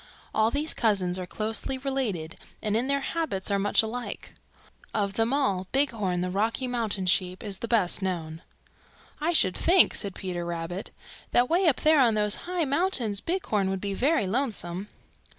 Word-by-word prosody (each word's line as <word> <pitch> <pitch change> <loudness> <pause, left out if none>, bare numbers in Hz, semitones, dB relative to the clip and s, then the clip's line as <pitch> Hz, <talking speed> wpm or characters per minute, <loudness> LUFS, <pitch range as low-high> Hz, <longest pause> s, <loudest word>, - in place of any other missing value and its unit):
All 220 0 +3
these 295 +5 +2
cousins 190 -5 +1
are 180 - -5
closely 220 +6 -2
related 245 - -3 0.2
and 210 -1 -1
in 240 +4 +1
their 280 0 +1
habits 270 -13 -2
are 200 - +2
much 205 +2 +3
alike. 240 +3 -5 0.6
Of 200 -2 0
them 225 +3 +1
all, 200 -10 0
Bighorn 220 -10 0
the 180 0 -2
Rocky 220 +6 0
Mountain 225 -6 -1
Sheep 185 0 +1
is 200 -3 -4
the 235 - -4
best 210 -5 +2
known." 165 -4 -3 0.8
"I 315 +3 +1
should 185 - +3
think," 360 +1 +5
said 200 -2 -4
Peter 180 -2 -4
Rabbit, 170 +3 -4 0.4
"that 245 +3 +2
way 355 +2 +3
up 285 - +3
there 310 -1 +5
on 235 -4 +4
those 210 -1 +2 0.2
high 360 -3 0
mountains 275 - 0
Bighorn 220 - 0
would 190 0 -2
be 200 +1 -3
very 275 +3 +2
lonesome." 195 -5 -1
215 Hz, 170 wpm, -27 LUFS, 190-270 Hz, 0.8 s, think